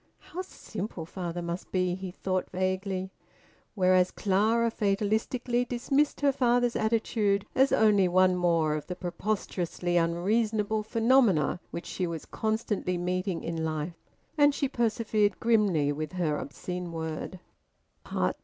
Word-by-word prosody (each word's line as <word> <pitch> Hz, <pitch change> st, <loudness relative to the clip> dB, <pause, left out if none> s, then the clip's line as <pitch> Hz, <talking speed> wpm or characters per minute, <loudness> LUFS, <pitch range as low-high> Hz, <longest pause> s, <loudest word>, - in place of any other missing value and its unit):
"How 365 Hz, -, -7 dB
simple 210 Hz, -, -6 dB
father 175 Hz, 0 st, -5 dB
must 170 Hz, +1 st, -5 dB
be!" 185 Hz, -1 st, +1 dB
he 190 Hz, +1 st, -5 dB
thought 185 Hz, 0 st, -2 dB
vaguely. 185 Hz, 0 st, -2 dB, 0.6 s
Whereas 185 Hz, -2 st, +4 dB
Clara 220 Hz, +5 st, +2 dB
fatalistically 220 Hz, +4 st, 0 dB
dismissed 270 Hz, +5 st, 0 dB
her 285 Hz, -1 st, +4 dB
father's 245 Hz, -2 st, +2 dB
attitude 220 Hz, -2 st, +1 dB
as 265 Hz, +1 st, +4 dB
only 210 Hz, -4 st, +4 dB
one 185 Hz, +1 st, +4 dB
more 170 Hz, -3 st, +2 dB
of 150 Hz, -1 st, -4 dB
the 180 Hz, -, -4 dB
preposterously 180 Hz, -2 st, -2 dB
unreasonable 210 Hz, +5 st, +1 dB
phenomena 225 Hz, -, +3 dB
which 170 Hz, -, -6 dB
she 180 Hz, -, -2 dB
was 165 Hz, -2 st, -5 dB
constantly 215 Hz, -4 st, -1 dB
meeting 180 Hz, 0 st, -2 dB
in 165 Hz, -1 st, -3 dB
life; 160 Hz, +1 st, -4 dB, 0.4 s
and 290 Hz, -1 st, +5 dB
she 280 Hz, -, 0 dB
persevered 215 Hz, -4 st, +1 dB
grimly 200 Hz, -11 st, +3 dB
with 155 Hz, +4 st, -4 dB
her 170 Hz, -5 st, 0 dB
obscene 180 Hz, +4 st, -5 dB
word. 160 Hz, +2 st, -5 dB
190 Hz, 125 wpm, -28 LUFS, 175-220 Hz, 0.6 s, and